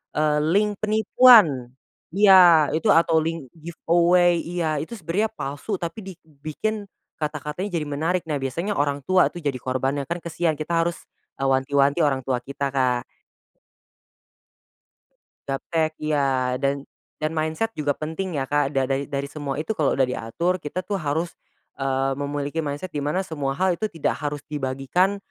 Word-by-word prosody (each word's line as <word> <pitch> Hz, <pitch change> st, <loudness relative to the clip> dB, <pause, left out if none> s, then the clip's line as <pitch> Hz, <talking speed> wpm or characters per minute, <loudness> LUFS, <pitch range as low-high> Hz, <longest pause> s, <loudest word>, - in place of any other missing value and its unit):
eee, 150 Hz, 0 st, +2 dB, 0.2 s
link 210 Hz, +1 st, +3 dB
penipuan. 215 Hz, -, +5 dB, 0.4 s
Iya 200 Hz, 0 st, +6 dB, 0.4 s
itu 210 Hz, -, -2 dB
atau 165 Hz, -1 st, +1 dB
link 165 Hz, -6 st, -4 dB, 0.2 s
giveaway 175 Hz, +1 st, +3 dB, 0.2 s
iya 165 Hz, -4 st, -1 dB
itu 165 Hz, -, -7 dB
sebenarnya 200 Hz, +4 st, -1 dB
palsu 145 Hz, +9 st, -5 dB
tapi 170 Hz, +5 st, -4 dB
dibikin 165 Hz, +6 st, -5 dB, 0.3 s
kata-katanya 150 Hz, +5 st, -3 dB
jadi 155 Hz, -3 st, -1 dB
menarik 165 Hz, +5 st, 0 dB
nah 145 Hz, -, 0 dB
biasanya 170 Hz, +10 st, -2 dB
orang 145 Hz, 0 st, 0 dB
tua 185 Hz, +3 st, +3 dB
tuh 175 Hz, -, -7 dB
jadi 140 Hz, -3 st, -1 dB
korbannya 135 Hz, +2 st, -1 dB
kan 170 Hz, -, -1 dB
kasihan 170 Hz, -1 st, 0 dB
kita 155 Hz, +3 st, -4 dB
harus, 170 Hz, -, -1 dB, 0.6 s
wanti-wanti 140 Hz, +3 st, +2 dB
orang 135 Hz, -2 st, 0 dB
tua 130 Hz, -2 st, 0 dB
kita 140 Hz, +1 st, -3 dB
Kak. 125 Hz, -2 st, +1 dB, 2.5 s
Gaptek 155 Hz, +3 st, -1 dB
iya 135 Hz, -4 st, 0 dB
dan 140 Hz, 0 st, -1 dB, 0.3 s
dan 155 Hz, +1 st, -2 dB
mindset 160 Hz, +8 st, -1 dB
juga 145 Hz, -2 st, -1 dB
penting 160 Hz, +3 st, -4 dB
ya 135 Hz, -, 0 dB
Kak 145 Hz, 0 st, +1 dB
da 135 Hz, -, +3 dB
da 135 Hz, +1 st, 0 dB
dari 140 Hz, 0 st, -3 dB
semua 145 Hz, -3 st, -4 dB
itu 160 Hz, +8 st, -2 dB
kalau 155 Hz, -9 st, +1 dB
udah 135 Hz, -, +3 dB
diatur 145 Hz, +10 st, -2 dB
kita 175 Hz, +5 st, -4 dB
tuh 200 Hz, -1 st, -2 dB
harus, 160 Hz, +3 st, -2 dB, 0.5 s
eee, 135 Hz, 0 st, 0 dB
memiliki 145 Hz, +2 st, -3 dB
mindset 150 Hz, +4 st, -4 dB
di 145 Hz, -, -3 dB
mana 150 Hz, +7 st, -1 dB
semua 140 Hz, -5 st, -3 dB
hal 185 Hz, +1 st, +2 dB
itu 215 Hz, +5 st, -2 dB
tidak 165 Hz, -6 st, -2 dB
harus 145 Hz, -1 st, -3 dB
dibagikan 145 Hz, +7 st, 0 dB
155 Hz, 150 wpm, -23 LUFS, 140-175 Hz, 2.5 s, Iya